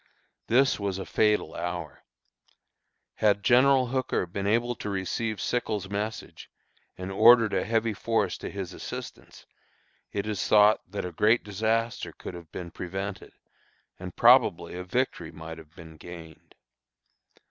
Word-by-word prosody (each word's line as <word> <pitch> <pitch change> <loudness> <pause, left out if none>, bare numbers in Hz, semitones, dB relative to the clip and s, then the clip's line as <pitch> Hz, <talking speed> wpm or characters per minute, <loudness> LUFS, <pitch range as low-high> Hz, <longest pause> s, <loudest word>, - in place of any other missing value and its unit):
This 130 +1 +3
was 100 -2 -2
a 95 - -5
fatal 105 -1 +1
hour. 90 0 -5 1.1
Had 100 -1 +2
General 130 +2 +5
Hooker 130 -6 -1
been 100 +3 -4
able 120 +3 +1
to 105 - -5
receive 100 +3 -2
Sickles' 105 -5 -2
message, 105 +2 -5 0.5
and 95 +1 -6
ordered 115 +2 +6
a - - +1
heavy 115 0 0
force 115 +3 0
to - - -6
his 95 -3 -6
assistance, - - -9 0.7
it 100 - -3
is 105 -3 -2
thought 105 0 +5
that 100 0 -4
a 90 - -5
great 110 +7 +3
disaster 110 +3 -1
could - - -9
have 85 -2 -11
been 85 -2 -7
prevented, 95 +3 -6 0.7
and 90 -1 -8
probably 115 -9 +4
a 90 +1 -5
victory 90 -5 -2
might 80 0 -9
have 80 +1 -16
been 80 -3 -12
gained. 80 -1 -12
100 Hz, 140 wpm, -27 LUFS, 90-115 Hz, 1.1 s, ordered